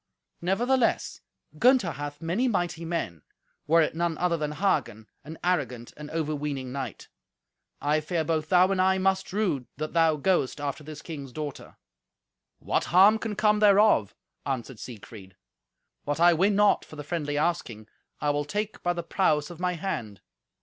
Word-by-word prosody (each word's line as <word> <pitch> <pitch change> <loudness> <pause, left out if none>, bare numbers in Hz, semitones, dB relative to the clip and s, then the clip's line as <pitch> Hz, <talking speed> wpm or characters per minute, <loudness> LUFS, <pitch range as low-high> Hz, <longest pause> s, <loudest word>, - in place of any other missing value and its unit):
Nevertheless, 235 +8 +1 0.4
Gunther 245 -8 +4
hath 145 +2 -7
many 190 +11 0
mighty 175 -6 -1
men, 160 - -3 0.5
were 165 +2 +5
it - - -2
none 165 -1 -1
other 180 -1 +1
than 150 -2 -3
Hagen, 150 - -1 0.2
an 160 +2 -9
arrogant 130 -10 -1
and 150 0 -9
overweening 150 -4 -3
knight. 130 -4 -6 0.7
I 150 +2 +1
fear 160 +1 -1
both 155 0 -1
thou 185 +1 +5
and 190 -1 +2
I 190 0 +3
must 190 0 0
rue 180 - -1
that 155 +1 -4
thou 165 -2 +4
goest 150 -3 0
after 145 +1 -4
this 150 0 -9
king's 140 -5 -7
daughter." 145 +1 -7 0.8
"What - - -1
harm 195 +6 +6
can 220 -2 -4
come 210 +1 +3
thereof?" 205 - +4 0.3
answered 130 -3 -4
Siegfried. 105 -5 -11 0.7
"What 145 +2 -2
I 175 +1 +6
win 195 +5 +2
not 205 0 +4
for - - -13
the 150 - -7
friendly 145 -2 -3
asking, 145 -10 -2 0.3
I 145 - +1
will 145 0 -1
take 210 +7 -4
by 175 - +1
the 170 -1 -4
prowess 160 -3 +1
of 170 - -11
my 180 0 0
hand. 120 - -5
160 Hz, 165 wpm, -27 LUFS, 145-185 Hz, 0.8 s, harm